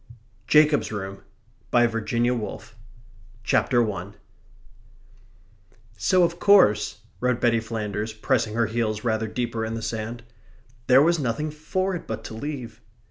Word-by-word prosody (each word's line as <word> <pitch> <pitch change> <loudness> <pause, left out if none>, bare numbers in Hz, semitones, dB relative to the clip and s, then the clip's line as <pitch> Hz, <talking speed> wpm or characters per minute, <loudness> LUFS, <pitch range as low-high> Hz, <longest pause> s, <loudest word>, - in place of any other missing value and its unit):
Jacob's 150 -8 +4
Room 100 -2 -6 0.5
VIRGINIA 120 0 +2
WOOLF 115 -1 -6 0.7
CHAPTER 120 +4 +2
ONE 100 -2 -5 1.8
"So 175 - +3
of 170 0 0
course," 105 - +4 0.2
wrote 125 -1 0
Betty 115 -1 +3
Flanders, 110 -1 -4
pressing 110 0 -1
her 115 0 +2
heels 110 -1 -2
rather 110 -2 0
deeper 115 0 -3
in 110 0 -3
the 115 - -5
sand, 115 +2 -4 0.6
"there 130 +2 +7
was 170 +1 +3
nothing 145 +4 -2
for 185 +6 -2
it 175 - -6
but 110 - -5
to - - -8
leave." 120 -3 -6
115 Hz, 130 wpm, -24 LUFS, 110-130 Hz, 1.8 s, there